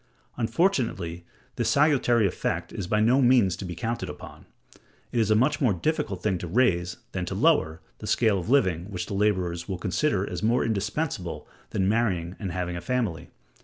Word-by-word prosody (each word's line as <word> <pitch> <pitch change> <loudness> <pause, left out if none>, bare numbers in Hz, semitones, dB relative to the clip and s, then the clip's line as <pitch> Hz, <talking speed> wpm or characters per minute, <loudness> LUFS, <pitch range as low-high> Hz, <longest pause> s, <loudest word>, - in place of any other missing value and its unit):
Unfortunately 115 - 0 0.3
this - - +1
salutary 135 -6 +3
effect 95 - -2
is 95 - -4
by 105 +3 +1
no 120 +5 +4
means 120 -8 +4
to 100 - -8
be 90 -1 -5
counted 115 +1 -3
upon: 75 - -10 0.6
it 120 - 0
is 110 -2 +2
a 110 - +5
much 135 +8 +2
more 120 -7 +3
difficult 100 - -2
thing 95 -4 0
to 90 - -5
raise, 90 -4 +1
than - - -3
to - - -4
lower, 80 +1 +2 0.2
the - - -7
scale 110 -5 +2
of 90 - -6
living 95 - +2
which 90 -3 -4
the - - -6
laborers 95 -4 0
will 95 - -2
consider 100 - 0
as - - -5
more 115 +3 +2
indispensable 105 - -2 0.2
than 95 - 0
marrying 95 -6 0
and 95 -4 -4
having 90 -1 -3
a 85 - -5
family. 105 -7 -2
100 Hz, 185 wpm, -26 LUFS, 90-120 Hz, 0.6 s, a